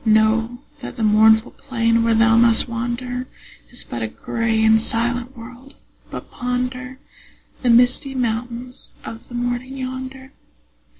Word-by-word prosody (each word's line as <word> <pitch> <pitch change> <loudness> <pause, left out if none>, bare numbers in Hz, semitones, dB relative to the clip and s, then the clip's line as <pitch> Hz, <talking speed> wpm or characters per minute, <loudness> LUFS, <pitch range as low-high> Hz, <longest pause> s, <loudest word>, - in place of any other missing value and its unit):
Know 220 +2 +2 0.2
that - - -7
the 225 - -2
mournful 220 +1 +5
plain 230 -4 0
where 230 0 +2
thou 225 0 +4
must 230 0 +5
wander 245 +2 -4 0.4
Is 245 - -11
but 120 - -6
a 110 - -1
gray 225 - -1
and 220 0 +5
silent 240 +2 -1
world, 245 +4 -12 0.3
but - - -8
ponder 250 +1 -3 0.6
The 250 - +1
misty 245 +3 +3
mountains 245 +1 -4
of 225 0 -9
the 240 - -9
morning 245 +2 -3
yonder. 260 +1 -6
240 Hz, 135 wpm, -21 LUFS, 225-250 Hz, 0.6 s, mournful